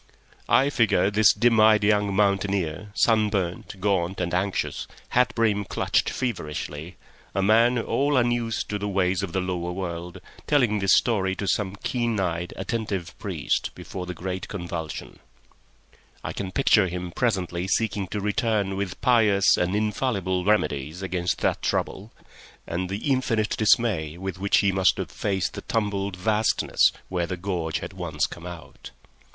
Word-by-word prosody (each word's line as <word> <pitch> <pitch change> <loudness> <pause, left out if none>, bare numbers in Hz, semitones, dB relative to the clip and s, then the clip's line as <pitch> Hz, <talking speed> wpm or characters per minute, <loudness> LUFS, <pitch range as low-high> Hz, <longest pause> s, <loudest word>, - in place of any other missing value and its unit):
I 140 +2 +4
figure 105 -6 +2
this 105 -1 +6
dim 115 +1 +3
eyed 110 -1 +6
young 105 -1 +2
mountaineer, 100 -3 0
sunburnt, 105 -4 +1
gaunt, 95 -2 0
and 90 -1 -2
anxious, 95 +2 -1 0.2
hat 125 0 +2
brim 110 -3 +2
clutched - - 0
feverishly, 80 - -4 0.4
a 95 - +1
man 115 +4 +4
all 140 +4 +1
unused 120 -2 0
to 105 - -2
the 105 - -3
ways 95 -1 +1
of 100 -3 -4
the 95 - 0
lower 90 -1 -3
world, 90 0 -5 0.3
telling 120 -8 +3
this 95 -1 +4
story 95 -5 +1
to 100 - -4
some 95 +1 0
keen 120 -4 0
eyed, 85 -2 -2
attentive 100 -7 -3
priest - - -2
before 90 -2 -7
the 90 - -5
great 95 +1 -4
convulsion; 85 -5 -6 1.0
I - - -4
can 95 -2 -4
picture 105 -6 +4
him 90 0 -5
presently 90 -5 -1
seeking 100 -1 0
to 105 - -4
return 105 -2 0
with 95 -2 -4
pious 105 -6 +4
and 90 +3 0
infallible 105 -4 0
remedies 80 -4 0
against 90 -2 -2
that - - +1
trouble, 105 +4 -2 0.5
and 90 +2 -3
the 105 +9 -2
infinite 115 -5 +1
dismay 105 -9 +2
with 95 -1 -5
which 100 +1 +3
he 100 -1 +2
must 95 -1 +3
have - - -4
faced 95 -2 -1
the - - -6
tumbled 100 -3 -2
vastness 105 +4 +2 0.2
where 90 -2 -2
the 90 - -4
gorge 85 -4 -2
had - - -7
once - - -2
come 85 +1 -8
out. 85 -2 -10
100 Hz, 155 wpm, -25 LUFS, 90-110 Hz, 1.0 s, this